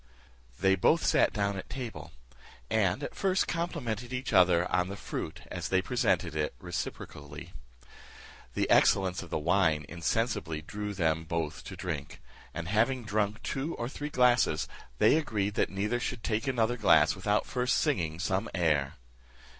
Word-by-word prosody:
They 95 +1 +4
both 155 - +3
sat - - +4
down 100 -1 -1
at 95 - -7
table, 125 -3 -6 0.6
and 100 -4 +1
at - - -4
first 190 -1 +1
complimented 125 - -3
each 130 +1 -3
other 90 -1 +5
on 90 -1 +2
the 100 - -5
fruit - - -5
as - - -4
they 95 - +3
presented 90 -9 0
it 75 -1 -1
reciprocally. 75 -4 -6 1.0
The - - +1
excellence 95 -1 +4
of 95 - -10
the - - -1
wine 80 -2 +2
insensibly 85 -2 -1
drew 105 +5 -5
them 80 -3 +1
both 80 -2 -3
to - - -7
drink; 75 -6 -5 0.3
and 85 -1 -5
having 115 +6 +1
drunk 105 0 -1
two 145 +5 -3
or 120 - -3
three 145 +3 -5
glasses, 125 - +3 0.3
they - - +5
agreed 105 -10 -1
that - - +1
neither 105 +5 -1
should 120 -1 -4
take 110 +2 -1
another 120 -2 +1
glass - - +5
without 105 +1 0
first 125 0 0
singing 85 - 0
some 95 +4 -1
air. 75 -6 +1
100 Hz, 155 wpm, -30 LUFS, 85-120 Hz, 1.0 s, other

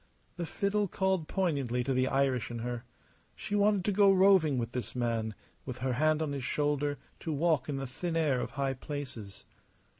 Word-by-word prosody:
The 170 -2 -3
fiddle 205 +3 0
called 190 -3 0
poignantly 140 -10 0
to 135 +1 0
the 130 0 +2
Irish 135 -3 +1
in 120 - -5
her. 120 0 -4 0.5
She - - -6
wanted 205 -2 +3
to 210 - +2
go 200 0 +5
roving 185 -7 +5
with 120 -1 -2
this 120 -2 -5
man; 115 -3 -1 0.3
with 130 -2 -6
her 130 0 -1
hand 155 +4 +2
on 150 - -2
his 140 -2 -3
shoulder 145 +1 0 0.2
to 165 - -4
walk 155 -2 +1
in 145 - -1
the 135 0 -3
thin 165 +7 -4
air 145 -6 +2
of - - -3
high 135 -1 0
places. 130 -7 -7
140 Hz, 190 wpm, -31 LUFS, 125-170 Hz, 0.5 s, go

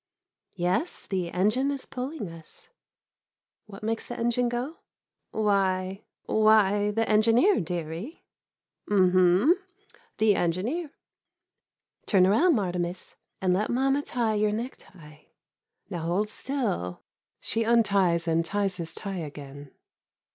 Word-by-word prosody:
Yes, 185 - -1
the 185 -3 -2
engine 215 +10 +1
is 280 -2 -4
pulling 260 -2 -5
us. 165 -1 -13 1.0
What 200 0 -11
makes 225 +1 -2
the 240 - -6
engine 240 +1 +1
go? 250 +7 -4 0.5
Why 195 -2 0
— - - -65
why 210 -1 +4
— - - -10
the 225 0 +1
engineer, 230 - +4
dearie. 170 - -5 0.7
Um 190 -3 +4
hum 185 - +5 0.3
— - - -29
the 215 -1 +4
engineer. 215 - -1 1.2
Turn 190 -4 +5
around, 300 - +4
Martimas, 180 -3 -3 0.3
and 185 -1 +2
let 205 +4 0
mamma 270 +3 +2
tie 235 -5 -1
your 210 0 +1
necktie. 185 -9 -8 0.7
Now 165 -3 -3
hold 205 +5 0
still. 220 - -3 0.4
[She 225 +1 0
unties 200 -7 +2
and 165 0 +2
ties 195 +1 -1
his 165 -2 -4
tie 195 -2 -5
again. 145 -2 -8
205 Hz, 125 wpm, -27 LUFS, 180-235 Hz, 1.2 s, hum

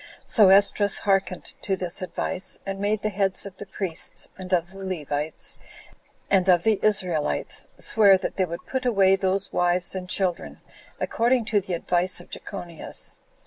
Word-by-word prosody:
So 210 -5 +5
Esdras 200 +1 +5
hearkened 195 -2 -1
to 195 - -1
this 180 -1 -2
advice, 185 +1 -3
and 195 0 -4
made 205 +1 -1
the 215 - +1
heads 195 -1 0
of 195 -1 -10
the 205 - -9
priests, 185 -4 -3
and 185 -1 -9
of 175 0 +1
the 195 0 -10
Levites, 155 -4 -3 0.7
and 190 -1 +2
of 175 -2 +5
the 220 -2 +2
Israelites, 180 -8 +1
swear 200 -3 +5
that 185 - -5
they 190 - +1
would 170 -1 -7
put 260 -1 -3
away 195 -5 +4
those 195 +1 -1
wives 175 0 +1
and 185 -1 -6
children, 185 -2 -1 0.4
according 235 0 +1
to 205 - +4
the 185 -1 -5
advice 180 +2 0
of - - -15
Jechonias. 175 -5 -6
190 Hz, 165 wpm, -24 LUFS, 180-200 Hz, 0.7 s, So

